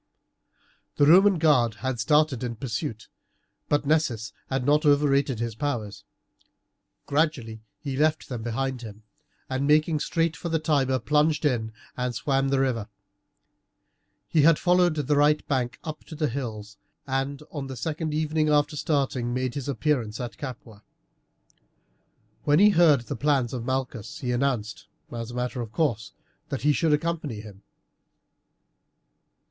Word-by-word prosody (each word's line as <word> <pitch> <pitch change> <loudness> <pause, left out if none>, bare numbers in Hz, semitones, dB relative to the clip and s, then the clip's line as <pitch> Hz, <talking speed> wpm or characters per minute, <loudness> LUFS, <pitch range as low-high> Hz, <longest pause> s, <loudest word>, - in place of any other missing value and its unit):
The 145 - +4
Roman 190 +5 +6
guard 130 -9 +3
had 130 +1 -3
started 150 +1 +2
in 120 -1 -3
pursuit, 115 0 -4 0.6
but 145 0 +1
Nessus 140 -8 0 0.2
had 130 -1 -1
not 150 +2 +3
overrated 140 -4 +3
his 115 -1 -2
powers. 110 -4 -4 1.0
Gradually 140 -8 -1 0.2
he 140 -3 -4
left 155 +2 +1
them 125 -4 -5
behind 125 +2 -2
him, 110 -2 -10 0.4
and, 135 +1 -1
making 155 +1 +3
straight 165 +1 0
for 170 - -5
the 165 - +1
Tiber, 140 -5 +1
plunged 150 +3 +1
in 115 -6 0 0.2
and 125 -1 -2
swam 135 +3 0
the 135 0 +2
river. 120 -6 0 1.4
He 155 - +3
had 160 +1 +6
followed 180 -2 +3
the 150 -1 0
right 150 +1 +3
bank 130 -2 -1
up 155 -2 -6
to 160 - -9
the 150 -2 0
hills, 110 -5 -6 0.3
and 135 +2 -2
on 140 -3 -5
the 130 -1 -7
second 160 +4 -3
evening 155 0 0
after 150 0 +2
starting 135 -5 -1
made 130 -1 -1
his 140 0 -4
appearance 130 -6 -1
at 120 -2 -5
Capua. 120 -6 -9 1.6
When 145 0 +3
he 210 +4 +7
heard 165 -7 +5
the 115 - -5
plans 135 -2 +1
of 120 -2 -4
Malchus 125 -4 -3
he 125 - -1
announced, 115 -7 -1 0.2
as 115 -1 -5
a 120 - -8
matter 125 0 -2
of 115 -2 -6
course, 120 -7 -1 0.4
that 135 - -4
he 150 0 +4
should 160 +1 +1
accompany 150 -6 -1
him. 100 -2 -13
135 Hz, 150 wpm, -26 LUFS, 120-150 Hz, 1.6 s, he